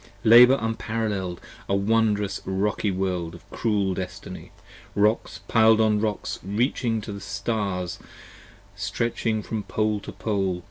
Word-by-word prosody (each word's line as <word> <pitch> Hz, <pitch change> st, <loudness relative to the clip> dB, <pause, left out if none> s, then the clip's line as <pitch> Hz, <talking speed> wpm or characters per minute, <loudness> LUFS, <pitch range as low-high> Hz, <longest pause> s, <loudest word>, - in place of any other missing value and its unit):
Labour 125 Hz, +4 st, +8 dB
unparall[el]ed! 110 Hz, -5 st, -2 dB, 0.3 s
a 100 Hz, -, +2 dB
wondrous 105 Hz, -1 st, +1 dB
rocky 100 Hz, +2 st, -1 dB
World 90 Hz, -3 st, -2 dB
of 85 Hz, -, -15 dB
cruel 100 Hz, -4 st, 0 dB
destiny, 90 Hz, 0 st, -7 dB, 0.4 s
Rocks 105 Hz, +3 st, +1 dB
piled 110 Hz, -1 st, +5 dB
on 110 Hz, -1 st, +3 dB
rocks 105 Hz, -1 st, -2 dB
reaching 115 Hz, +3 st, 0 dB
the 105 Hz, -1 st, -6 dB
stars, 100 Hz, -4 st, -3 dB, 0.8 s
stretching 115 Hz, -2 st, -1 dB
from 110 Hz, 0 st, -3 dB
pole 105 Hz, 0 st, -1 dB
to -, -, -8 dB
pole. 95 Hz, -4 st, -1 dB
105 Hz, 120 wpm, -25 LUFS, 95-110 Hz, 0.8 s, Labour